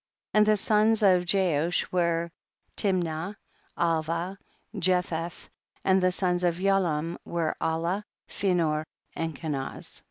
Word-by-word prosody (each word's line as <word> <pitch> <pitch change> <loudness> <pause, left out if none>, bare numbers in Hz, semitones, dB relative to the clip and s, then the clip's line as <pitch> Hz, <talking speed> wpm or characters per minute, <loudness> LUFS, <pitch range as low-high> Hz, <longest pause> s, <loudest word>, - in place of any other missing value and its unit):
24. 215 - +3
And 210 - +6
the 215 0 +4
sons 215 +2 +3
of 180 -3 +5
Jeush 175 -3 +2
were 170 -1 +1 0.4
Timnah, 180 -1 0 0.4
Alvah, 165 +2 0 0.4
Jetheth; 175 -3 -1 0.4
and 190 0 +4
the 185 0 +3
sons 180 -1 +1
of 175 -1 +2
Yaalam 175 -4 +1
were 165 -2 -1
Alah, 170 +5 0 0.2
Phinor 165 -6 0 0.3
and 165 -2 -3
Kenaz. 140 -4 -5
175 Hz, 120 wpm, -27 LUFS, 165-190 Hz, 0.4 s, And